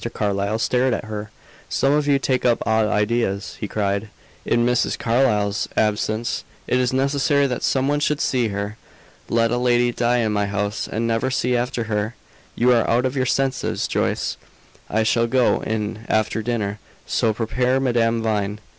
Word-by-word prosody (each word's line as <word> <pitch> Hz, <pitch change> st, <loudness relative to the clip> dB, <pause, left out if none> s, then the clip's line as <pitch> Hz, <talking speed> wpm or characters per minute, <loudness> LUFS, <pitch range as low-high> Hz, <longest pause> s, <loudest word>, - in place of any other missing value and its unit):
Carlyle 100 Hz, +1 st, 0 dB
stared 125 Hz, +2 st, +1 dB
at -, -, -5 dB
her. 105 Hz, 0 st, -6 dB, 0.4 s
"Some 135 Hz, +1 st, +2 dB
of 150 Hz, 0 st, +1 dB
you 140 Hz, -1 st, +4 dB
take 130 Hz, -2 st, 0 dB
up 120 Hz, -2 st, +2 dB
odd 110 Hz, -1 st, +2 dB
ideas," 105 Hz, -2 st, -1 dB
he 105 Hz, -, -3 dB
cried. 100 Hz, 0 st, -1 dB, 0.4 s
"In 120 Hz, 0 st, +2 dB
Mrs. 125 Hz, 0 st, +1 dB
Carlyle's 105 Hz, -4 st, +1 dB
absence, 110 Hz, +2 st, 0 dB, 0.2 s
it 125 Hz, -, +1 dB
is 125 Hz, -1 st, +1 dB
necessary 140 Hz, +2 st, +2 dB
that 125 Hz, -3 st, -2 dB
some 135 Hz, 0 st, +1 dB
one 145 Hz, +1 st, +1 dB
should 150 Hz, 0 st, 0 dB
see 125 Hz, -3 st, +1 dB
her! 100 Hz, +1 st, -4 dB, 0.5 s
Let 115 Hz, 0 st, +2 dB
a 120 Hz, -, +1 dB
lady 120 Hz, 0 st, +3 dB
die 120 Hz, +1 st, +1 dB
in 110 Hz, -3 st, +1 dB
my 105 Hz, -1 st, 0 dB
house, 100 Hz, +1 st, -2 dB
and 115 Hz, +2 st, -1 dB
never 115 Hz, +3 st, 0 dB
see 125 Hz, -1 st, 0 dB
after 120 Hz, 0 st, -1 dB
her! 110 Hz, +1 st, -2 dB, 0.4 s
You 125 Hz, +2 st, +3 dB
are 115 Hz, -, +2 dB
out 120 Hz, +2 st, +2 dB
of 130 Hz, +1 st, -1 dB
your 130 Hz, -1 st, 0 dB
senses, 135 Hz, +1 st, 0 dB
Joyce. -, -, -1 dB, 0.5 s
I 110 Hz, +1 st, +1 dB
shall 115 Hz, +1 st, +2 dB
go 125 Hz, 0 st, +2 dB
in 110 Hz, 0 st, -3 dB
after 110 Hz, 0 st, +1 dB
dinner; 105 Hz, -3 st, -2 dB, 0.3 s
so 110 Hz, -, +1 dB
prepare 125 Hz, +4 st, 0 dB
Madame 115 Hz, -3 st, +1 dB
Vine." 105 Hz, -2 st, -1 dB
115 Hz, 175 wpm, -22 LUFS, 105-125 Hz, 0.5 s, you